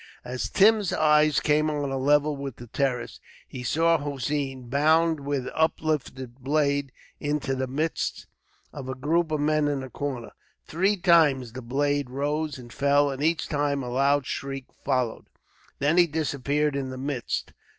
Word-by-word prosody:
As 125 Hz, -4 st, -3 dB
Tim's 210 Hz, -, +4 dB
eyes 150 Hz, -1 st, +4 dB
came 155 Hz, +1 st, +2 dB
on 145 Hz, -2 st, -2 dB
a 135 Hz, -, -1 dB
level 145 Hz, +2 st, +3 dB
with 140 Hz, -3 st, -6 dB
the 120 Hz, -, -11 dB
terrace, 125 Hz, -1 st, -2 dB, 0.3 s
he 125 Hz, -, -8 dB
saw 165 Hz, +6 st, +2 dB
Hossein 140 Hz, -2 st, -3 dB
bound 160 Hz, +4 st, +3 dB
with 140 Hz, -2 st, -2 dB
uplifted 150 Hz, -5 st, -1 dB
blade 140 Hz, 0 st, 0 dB, 0.3 s
into 145 Hz, -2 st, -1 dB
the 130 Hz, 0 st, -2 dB
midst 155 Hz, +5 st, -2 dB, 0.5 s
of 135 Hz, -3 st, -7 dB
a 130 Hz, -, -3 dB
group 160 Hz, +5 st, +1 dB
of 155 Hz, -1 st, -1 dB
men 155 Hz, 0 st, +2 dB
in 145 Hz, -2 st, -1 dB
the 130 Hz, -1 st, -8 dB
corner. 130 Hz, -5 st, -4 dB, 0.3 s
Three 195 Hz, +6 st, +1 dB
times 155 Hz, -10 st, +3 dB
the 130 Hz, -, -6 dB
blade 140 Hz, +2 st, 0 dB
rose 145 Hz, +3 st, -2 dB
and 120 Hz, -2 st, -12 dB
fell, 145 Hz, 0 st, +3 dB
and 135 Hz, 0 st, -6 dB
each 160 Hz, -1 st, +1 dB
time 145 Hz, -2 st, 0 dB
a 125 Hz, -, -5 dB
loud 140 Hz, +2 st, +2 dB
shriek 135 Hz, -1 st, -4 dB, 0.2 s
followed. 130 Hz, -4 st, -1 dB, 0.5 s
Then 145 Hz, +5 st, +1 dB
he 175 Hz, -1 st, +6 dB
disappeared 150 Hz, -1 st, -1 dB
in 135 Hz, -2 st, -2 dB
the 130 Hz, -, -6 dB
midst. 130 Hz, -2 st, -3 dB
145 Hz, 160 wpm, -26 LUFS, 130-150 Hz, 0.5 s, he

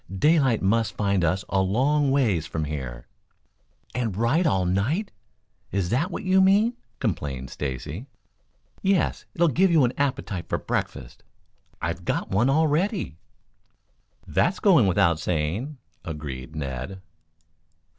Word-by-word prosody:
"Daylight 135 Hz, -, +3 dB
must 110 Hz, +3 st, +1 dB
find 100 Hz, -3 st, +1 dB
us 90 Hz, +5 st, 0 dB
a 95 Hz, -, +1 dB
long 135 Hz, +9 st, +2 dB
ways 110 Hz, -, +2 dB
from 80 Hz, -, -3 dB
here." 65 Hz, -5 st, -5 dB, 0.9 s
"And 115 Hz, -6 st, -2 dB
ride 140 Hz, -, +2 dB
all 95 Hz, -10 st, +2 dB
night 125 Hz, -, 0 dB, 0.6 s
is 95 Hz, -2 st, -1 dB
that 145 Hz, +10 st, +1 dB
what 190 Hz, -, -5 dB
you 190 Hz, 0 st, +4 dB
mean?" 205 Hz, +5 st, +4 dB, 0.2 s
complained 75 Hz, -, -3 dB
Stacy. 75 Hz, -, -5 dB, 0.7 s
"Yes; 195 Hz, -2 st, +1 dB
it'll 170 Hz, 0 st, +4 dB
give 185 Hz, +7 st, +3 dB
you 165 Hz, -5 st, +5 dB
an 120 Hz, -, -1 dB
appetite 130 Hz, -11 st, -2 dB
for -, -, +1 dB
breakfast." 65 Hz, -3 st, -4 dB, 0.6 s
"I've -, -, -2 dB
got -, -, -2 dB
one 110 Hz, +7 st, +3 dB
already." 160 Hz, -, +1 dB, 1.1 s
"That 180 Hz, -, +1 dB
goes 165 Hz, -, +6 dB
without 85 Hz, -3 st, +3 dB
saying," 90 Hz, -, -2 dB, 0.3 s
agreed 75 Hz, -2 st, -6 dB
Ned. 70 Hz, +6 st, -5 dB
110 Hz, 125 wpm, -25 LUFS, -, 1.1 s, goes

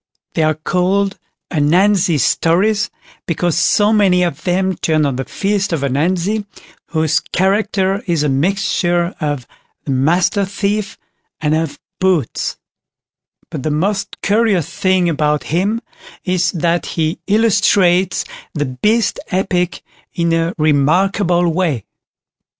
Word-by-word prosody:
They -, -, 0 dB
are 155 Hz, 0 st, +2 dB
called 190 Hz, +5 st, 0 dB, 0.3 s
"Ananzi 175 Hz, +2 st, +3 dB
Stories", 195 Hz, -, +2 dB, 0.4 s
because 170 Hz, 0 st, 0 dB
so 205 Hz, +5 st, +3 dB
many 190 Hz, -4 st, +3 dB
of 165 Hz, -4 st, -3 dB
them 190 Hz, +1 st, +1 dB
turn 155 Hz, -2 st, +1 dB
on 140 Hz, -3 st, -1 dB
the 135 Hz, +1 st, -3 dB
feats 200 Hz, -1 st, -1 dB
of 160 Hz, -4 st, -1 dB
Ananzi, 175 Hz, +10 st, 0 dB, 0.4 s
whose 155 Hz, -1 st, +1 dB
character 195 Hz, 0 st, 0 dB
is 165 Hz, -4 st, +1 dB
a -, -, +1 dB
mixture 175 Hz, +3 st, 0 dB
of 145 Hz, -4 st, -2 dB, 0.4 s
"the 140 Hz, -, -2 dB
Master 170 Hz, +9 st, +2 dB
thief", 200 Hz, +1 st, -2 dB, 0.4 s
and 150 Hz, -1 st, 0 dB
of 155 Hz, -2 st, -1 dB, 0.2 s
"Boots"; 185 Hz, -9 st, 0 dB, 0.9 s
but -, -, -4 dB
the 155 Hz, -, -2 dB
most 195 Hz, +7 st, -1 dB
curious 205 Hz, -6 st, +2 dB
thing 185 Hz, 0 st, +1 dB
about 150 Hz, -2 st, 0 dB
him, 205 Hz, +7 st, +1 dB, 0.4 s
is 185 Hz, 0 st, +1 dB
that 170 Hz, 0 st, 0 dB
he 160 Hz, +1 st, 0 dB
illustrates 200 Hz, -4 st, +3 dB, 0.3 s
the 145 Hz, -1 st, 0 dB
Beast 210 Hz, -, 0 dB
Epic 180 Hz, -2 st, -1 dB, 0.3 s
in 170 Hz, -1 st, +1 dB
a 165 Hz, +1 st, 0 dB
remarkable 175 Hz, +4 st, +2 dB
way. 160 Hz, -, -1 dB
175 Hz, 120 wpm, -17 LUFS, 155-195 Hz, 0.9 s, Ananzi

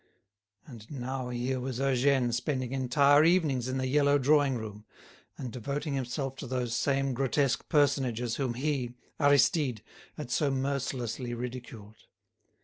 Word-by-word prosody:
And 115 Hz, -6 st, -12 dB
now 130 Hz, -2 st, -4 dB
here 125 Hz, +2 st, -2 dB
was 125 Hz, -1 st, -4 dB
Eugène 135 Hz, -2 st, +2 dB
spending 130 Hz, 0 st, -2 dB
entire 140 Hz, +3 st, +4 dB
evenings 155 Hz, -8 st, +2 dB
in 130 Hz, +1 st, -2 dB
the 130 Hz, -, -1 dB
yellow 140 Hz, +2 st, +3 dB
drawing 145 Hz, 0 st, +3 dB
room, 105 Hz, -2 st, -7 dB, 0.5 s
and 125 Hz, -3 st, -5 dB
devoting 140 Hz, +5 st, -3 dB
himself 135 Hz, +1 st, -3 dB
to 140 Hz, -, -7 dB
those 125 Hz, -2 st, -2 dB
same 135 Hz, +1 st, +1 dB
grotesque 135 Hz, +2 st, 0 dB
personages 130 Hz, -5 st, +1 dB
whom 130 Hz, -4 st, -1 dB
he, 130 Hz, -3 st, -2 dB, 0.2 s
Aristide, 145 Hz, -, +3 dB, 0.3 s
had 140 Hz, -5 st, -6 dB
so 145 Hz, +2 st, +2 dB
mercilessly 130 Hz, -3 st, -2 dB
ridiculed. 120 Hz, -3 st, -8 dB
130 Hz, 135 wpm, -29 LUFS, 120-140 Hz, 0.5 s, entire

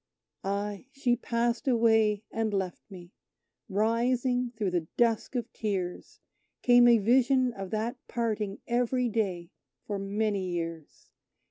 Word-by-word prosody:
Ay, 200 Hz, +3 st, -3 dB
she 265 Hz, -3 st, +1 dB
passed 235 Hz, +1 st, -1 dB
away 225 Hz, -4 st, +3 dB
and 220 Hz, -2 st, -1 dB
left 190 Hz, -2 st, -2 dB
me! 180 Hz, -3 st, -11 dB, 0.6 s
Rising 240 Hz, +4 st, +1 dB
through 205 Hz, -4 st, 0 dB
the 170 Hz, -3 st, -1 dB
dusk 235 Hz, +1 st, +1 dB
of 240 Hz, -, -3 dB
tears, 190 Hz, -5 st, -4 dB, 0.4 s
Came 245 Hz, -1 st, +7 dB
a 235 Hz, -1 st, +7 dB
vision 250 Hz, +3 st, +3 dB
of 195 Hz, -3 st, -6 dB
that 220 Hz, +5 st, -2 dB
parting 215 Hz, -4 st, -2 dB
every 245 Hz, +1 st, +1 dB
day 190 Hz, -6 st, -2 dB, 0.3 s
for 205 Hz, -2 st, -3 dB
many 200 Hz, -1 st, -1 dB
years! 165 Hz, -3 st, -6 dB
220 Hz, 125 wpm, -29 LUFS, 195-240 Hz, 0.6 s, Came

